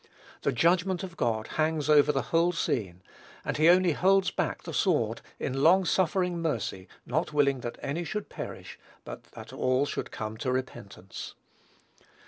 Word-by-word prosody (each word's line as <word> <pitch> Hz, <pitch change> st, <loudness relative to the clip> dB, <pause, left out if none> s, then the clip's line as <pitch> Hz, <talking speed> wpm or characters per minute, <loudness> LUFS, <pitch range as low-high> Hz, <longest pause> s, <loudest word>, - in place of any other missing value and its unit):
The 140 Hz, -, +1 dB
judgment 175 Hz, +7 st, +2 dB
of 180 Hz, -3 st, -7 dB
God 110 Hz, -6 st, 0 dB
hangs 155 Hz, -1 st, +1 dB
over 150 Hz, -1 st, +5 dB
the 135 Hz, -2 st, -1 dB
whole 170 Hz, +2 st, +4 dB
scene; 95 Hz, -, -2 dB, 0.4 s
and -, -, -2 dB
he 155 Hz, +2 st, +5 dB
only 180 Hz, 0 st, +5 dB
holds 190 Hz, +4 st, +3 dB
back -, -, -2 dB
the -, -, -7 dB
sword, -, -, +1 dB, 0.2 s
in 135 Hz, +1 st, -2 dB
long 185 Hz, +5 st, +5 dB
suffering 180 Hz, 0 st, +1 dB
mercy, 115 Hz, -, -2 dB, 0.2 s
not 155 Hz, +4 st, -1 dB
willing 140 Hz, -2 st, +3 dB
that 120 Hz, -1 st, -6 dB
any 160 Hz, +5 st, -2 dB
should 210 Hz, +4 st, -4 dB
perish, -, -, -8 dB, 0.3 s
but -, -, -8 dB
that 115 Hz, +3 st, -10 dB
all 130 Hz, +1 st, +1 dB
should -, -, -4 dB
come 110 Hz, 0 st, -5 dB
to 130 Hz, -, -2 dB
repentance. 120 Hz, -7 st, -6 dB
150 Hz, 160 wpm, -28 LUFS, 120-175 Hz, 0.4 s, over